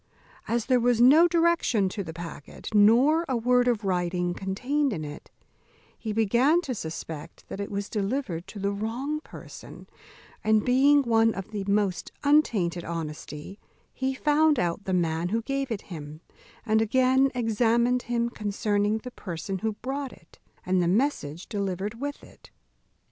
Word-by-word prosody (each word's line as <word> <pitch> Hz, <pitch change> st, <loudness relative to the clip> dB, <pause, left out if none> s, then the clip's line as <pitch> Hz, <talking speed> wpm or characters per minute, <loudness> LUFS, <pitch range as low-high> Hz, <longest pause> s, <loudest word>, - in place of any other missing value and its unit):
As 235 Hz, -1 st, 0 dB
there 255 Hz, -1 st, +3 dB
was 240 Hz, -1 st, +2 dB
no 290 Hz, +8 st, +7 dB
direction 335 Hz, -, +2 dB
to 200 Hz, +1 st, -4 dB
the 160 Hz, -, -7 dB
packet, 165 Hz, +2 st, -9 dB
nor 240 Hz, +10 st, +5 dB
a 255 Hz, -, +1 dB
word 250 Hz, +1 st, +3 dB
of 230 Hz, -3 st, +1 dB
writing 180 Hz, -1 st, 0 dB
contained 250 Hz, +10 st, -1 dB
in 155 Hz, -5 st, -4 dB
it, 145 Hz, 0 st, -9 dB, 0.7 s
he 220 Hz, -, -5 dB
began 235 Hz, -, +3 dB
to 270 Hz, -7 st, -4 dB
suspect 160 Hz, -4 st, -7 dB
that -, -, -6 dB
it 200 Hz, -, -4 dB
was 200 Hz, 0 st, -3 dB
delivered 200 Hz, -5 st, -3 dB
to -, -, -10 dB
the 200 Hz, 0 st, -1 dB
wrong 235 Hz, +9 st, -3 dB
person; -, -, -12 dB, 0.6 s
and 215 Hz, -1 st, +3 dB
being 275 Hz, +3 st, +5 dB
one 225 Hz, -2 st, +3 dB
of 195 Hz, +2 st, -7 dB
the 205 Hz, -2 st, -4 dB
most 200 Hz, -4 st, 0 dB
untainted 215 Hz, -, +2 dB
honesty, 160 Hz, +2 st, -6 dB, 0.3 s
he 265 Hz, 0 st, -2 dB
found 300 Hz, +1 st, +3 dB
out 175 Hz, +1 st, -1 dB
the 190 Hz, -, -2 dB
man 170 Hz, -1 st, 0 dB
who 225 Hz, +3 st, -1 dB
gave 275 Hz, +1 st, -2 dB
it 225 Hz, -4 st, -4 dB
him, 150 Hz, 0 st, -8 dB, 0.4 s
and 220 Hz, -1 st, +3 dB
again 260 Hz, +4 st, +3 dB
examined 235 Hz, +1 st, +2 dB
him 235 Hz, -1 st, -1 dB
concerning 205 Hz, 0 st, 0 dB
the 250 Hz, +3 st, -8 dB
person 190 Hz, -1 st, -5 dB
who 220 Hz, +1 st, -1 dB
brought 270 Hz, 0 st, -3 dB
it, 160 Hz, -, -19 dB, 0.3 s
and 185 Hz, 0 st, +2 dB
the 175 Hz, -, +1 dB
message 180 Hz, -, 0 dB
delivered 200 Hz, +2 st, -3 dB
with 285 Hz, 0 st, -4 dB
it. -, -, -17 dB
220 Hz, 160 wpm, -26 LUFS, 185-255 Hz, 0.7 s, no